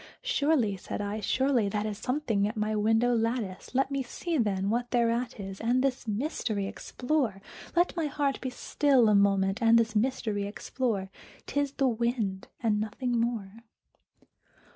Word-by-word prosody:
"Surely," 280 -9 +2
said - - -6
I, 205 +1 -3
"surely 245 +1 +1
that 210 +1 -1
is 215 -1 -2
something 245 -6 0
at 220 +2 -5
my 215 0 0
window 225 +3 +3
lattice; 230 -2 -2
Let 270 +1 +2
me 275 -1 0
see, 330 +7 -4
then, 200 -3 +1
what 240 +1 -1
thereat 235 -1 0
is, 195 -1 -6
and 245 +3 +2
this 265 -3 -1
mystery 215 -3 -1
explore 245 0 -2 0.4
Let 350 +1 +3
my 330 -3 0
heart 285 -1 -1
be 260 - -2
still 260 -2 +3
a - - +4
moment 195 +1 +3
and 230 0 +6
this 225 -1 +1
mystery 215 -3 0
explore; 205 -2 -2 0.3
'T 285 - -1
is 285 -1 -1
the 275 -2 +2
wind 230 -5 -1 0.2
and 215 -2 +2
nothing 220 +4 -2
more!" 230 -4 -1
230 Hz, 165 wpm, -29 LUFS, 205-260 Hz, 0.4 s, and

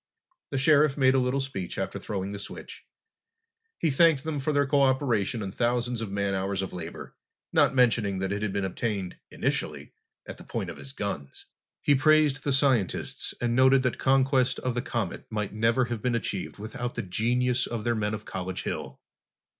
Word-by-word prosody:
The 135 - -2
Sheriff 145 +1 +4
made 130 -2 +5
a 135 - +3
little 125 +2 +1
speech 135 -10 -4
after - - -3
throwing 100 -1 -4
the 100 - -6
switch. - - -9 0.9
He 160 - +1
thanked 150 -1 +4
them 155 -2 -2
for 140 +3 0
their 145 -1 +2
co 140 +1 +2
operation 125 -5 +1
and 95 -1 -5
thousands 120 0 0
of 110 -3 -4
man 100 0 -1
hours 95 0 -1
of 95 - -6
labor, 85 -2 -8 0.4
not - - +4
mentioning 115 -6 +3
that 95 +1 -2
it 100 +1 -2
had 105 -2 -1
been 100 0 -1
obtained, 95 -1 -3
initially, - - -3 0.3
at - - -8
the - - -11
point - - -4
of - - -11
his 135 - -9
guns. 100 - -5 0.4
He 145 - +4
praised 150 0 +4
the 140 - 0
scientists 130 -8 +1
and 120 -1 0
noted 130 +1 +5
that 125 - -1
conquest 135 -1 +3
of 125 - -1
the 120 - -1
comet 120 - -3
might 105 -2 -3
never 115 +3 +2
have 120 -3 -4
been 125 0 0
achieved 100 -5 -3
without 110 +3 -5
the - - -2
genius 120 +6 +1
of 115 -3 -4
their 120 - +1
men 110 -1 -1
of 105 - -9
College 95 0 -4
Hill. - - -5
120 Hz, 195 wpm, -27 LUFS, 100-135 Hz, 0.9 s, made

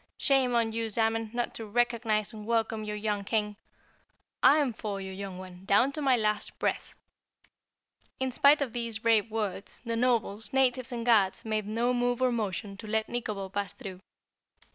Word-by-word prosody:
Shame 265 -3 +3
on 230 -1 +2
you, 225 0 -2
Zamen, 225 0 +1
not 240 0 -2
to 225 - -6
recognize 230 -2 0
and 215 -1 -9
welcome 225 -1 0
your 210 0 -4
young 210 -1 -2
King. 210 0 0 0.9
I'm 285 -4 +5
for 205 -2 -4
you, 190 0 -6
young 190 -1 -6
one, 185 -1 -10
down 235 +8 +4
to 300 - -5
my 265 -3 +4
last 210 -2 -1
breath!" - - -2 1.2
In 260 0 -1
spite 280 +3 +5
of 245 -4 -6
these 235 -2 -3
brave 225 -1 +4
words, 210 -3 -3
the 230 0 -1
nobles, 225 -3 0
natives 255 -1 +2
and 235 -1 -4
guards 210 -5 +3
made 215 -2 -1
no 235 +3 +1
move 245 0 0
or 255 -1 +3
motion 205 -3 -3
to 220 - -9
let 220 +1 0
Nikobo 210 -5 -3
pass 200 0 -3
through. 190 -7 -9
225 Hz, 175 wpm, -29 LUFS, 210-240 Hz, 1.2 s, I'm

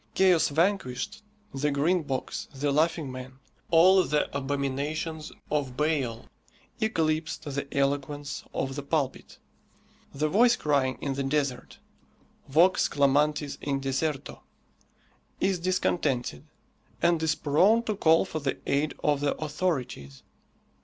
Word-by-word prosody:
"Chaos 185 -4 +4
Vanquished," 190 - -1 0.3
the 140 +2 0
Green 155 +6 +2
Box, 135 -4 -4
the 140 +1 0
Laughing 155 -1 +1
Man, 130 0 -9 0.3
all 185 +3 +6
the 150 -3 -1
abominations 145 +3 -3 0.2
of 140 -4 -1
Baal, 140 -7 -1 0.5
eclipsed 160 -6 -1
the 140 -2 -4
eloquence 145 +1 -2
of 135 0 -3
the 145 - -3
pulpit. 140 -1 -2 0.7
The 150 +2 -1
voice 235 +8 +4
crying 140 - 0
in 140 - -2
the 140 - -3
desert, 135 -2 -2 0.7
vox 175 +7 +4
clamantis 145 +1 +1
in 140 -1 -1
deserto, 135 +1 -3 1.0
is 190 -2 +1
discontented, 150 - -1 0.5
and 170 -1 +2
is 160 -1 +1
prone 190 +12 +3
to 215 -2 -2
call 165 -3 +4
for 160 - -4
the 140 -2 -2
aid 145 +2 0
of 145 -1 +2
the 145 0 0
authorities. 135 - -3
150 Hz, 120 wpm, -27 LUFS, 135-165 Hz, 1.0 s, all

